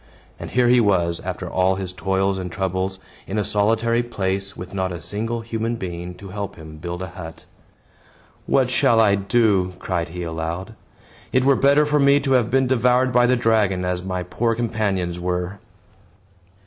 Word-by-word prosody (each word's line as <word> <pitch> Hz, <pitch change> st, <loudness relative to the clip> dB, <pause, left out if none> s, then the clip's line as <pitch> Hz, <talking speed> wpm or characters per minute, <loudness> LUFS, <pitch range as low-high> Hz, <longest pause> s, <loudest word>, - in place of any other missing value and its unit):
And -, -, -6 dB
here 125 Hz, -1 st, +2 dB
he 125 Hz, 0 st, +5 dB
was, 85 Hz, -5 st, +2 dB
after -, -, -5 dB
all 95 Hz, +1 st, +2 dB
his 95 Hz, -1 st, -5 dB
toils 95 Hz, +1 st, 0 dB
and 90 Hz, -1 st, -5 dB
troubles, 95 Hz, +1 st, -2 dB, 0.3 s
in 100 Hz, -, -3 dB
a 105 Hz, -, 0 dB
solitary 115 Hz, +4 st, +2 dB
place, 100 Hz, -4 st, -3 dB
with 90 Hz, +2 st, -8 dB
not 95 Hz, -1 st, -1 dB
a 85 Hz, -, -5 dB
single 115 Hz, +5 st, -3 dB
human 115 Hz, +1 st, -2 dB
being 90 Hz, -3 st, -6 dB
to 95 Hz, +2 st, -11 dB
help 100 Hz, 0 st, -5 dB
him 80 Hz, -2 st, -11 dB
build 85 Hz, +3 st, -5 dB
a 95 Hz, -, -6 dB
hut. 85 Hz, -2 st, -10 dB, 1.0 s
"What 130 Hz, -2 st, +2 dB
shall 115 Hz, -2 st, +3 dB
I 105 Hz, -3 st, +5 dB
do?" 100 Hz, -2 st, +2 dB
cried 85 Hz, -3 st, -2 dB
he 90 Hz, +1 st, -6 dB
aloud. 85 Hz, +5 st, -4 dB, 0.6 s
"It 130 Hz, 0 st, +2 dB
were 140 Hz, 0 st, +5 dB
better 140 Hz, +3 st, +4 dB
for 150 Hz, 0 st, +2 dB
me 140 Hz, 0 st, +5 dB
to 135 Hz, -1 st, -2 dB
have 125 Hz, -3 st, +3 dB
been 130 Hz, +1 st, +3 dB
devoured 125 Hz, 0 st, +2 dB
by 125 Hz, 0 st, +5 dB
the 125 Hz, 0 st, +3 dB
dragon, 105 Hz, -6 st, +2 dB
as 90 Hz, 0 st, -1 dB
my 90 Hz, -1 st, -3 dB
poor 115 Hz, +6 st, -1 dB
companions 100 Hz, -7 st, -1 dB
were." 90 Hz, +2 st, -3 dB
100 Hz, 180 wpm, -22 LUFS, 90-115 Hz, 1.0 s, he